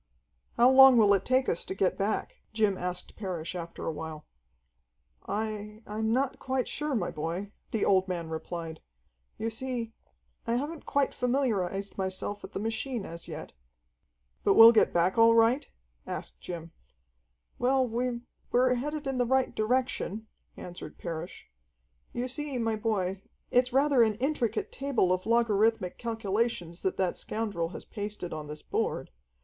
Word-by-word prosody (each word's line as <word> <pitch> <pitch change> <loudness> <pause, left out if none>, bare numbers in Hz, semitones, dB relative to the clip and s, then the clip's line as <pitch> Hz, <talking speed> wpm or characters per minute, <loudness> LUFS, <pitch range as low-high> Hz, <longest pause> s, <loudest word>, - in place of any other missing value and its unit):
"How 240 - +7
long 265 -1 +9
will 205 -3 +6
it 195 -1 +1
take 260 +1 +2
us 170 - 0
to 190 - -5
get 190 -1 +1
back?" 205 +2 -2 0.2
Jim 215 -3 +2
asked 180 0 -5
Parrish 180 -6 -4
after 170 -2 -6
a - - 0
while. 155 0 -7 1.0
"I 215 0 -4
I'm 220 +1 -2
not 260 +3 0
quite 260 -1 -1
sure, 300 -2 -2
my 180 -6 -1
boy," 170 +6 -4 0.2
the 220 - 0
old 190 -1 +3
man 175 -3 -3
replied. 160 0 -5 0.6
"You 225 +1 -2
see 235 -1 -4 0.5
I 230 - +1
haven't 295 +5 -4
quite 280 -1 +1
familiarized 205 -7 -1
myself 190 +2 -2
with - - -10
the - - -3
machine 225 +1 -2
as 170 +1 -7
yet." 160 -2 -7 0.9
"But 200 - +4
we'll 225 +1 +11
get 225 - +4
back 180 +6 +2
all 230 0 +7
right?" 230 +5 +4 0.4
asked - - -6
Jim. 165 -2 -7 0.9
"Well, 260 +1 +3
we 240 +1 -2 0.3
we're 250 +1 +4
headed 295 +4 -3
in 270 -2 -1
the 245 - +3
right 265 +1 +2
direction," 225 -2 -1 0.3
answered 180 0 -8
Parrish. 170 +1 -6 0.6
"You 245 +1 -2
see, 285 +1 -3
my 225 -2 0
boy, 195 -4 -1 0.3
it's 250 +1 +3
rather 275 0 +4
an 220 -2 +4
intricate 245 -2 -1
table 265 -10 +1
of 185 +2 -3
logarithmic 225 -4 +2
calculations 220 -6 -2
that 190 - -1
that 185 -2 0
scoundrel 205 -7 -2
has - - -8
pasted 205 -4 -5
on 155 -1 -6
this 150 0 -8
board. - - -2
220 Hz, 155 wpm, -29 LUFS, 185-245 Hz, 1.0 s, we'll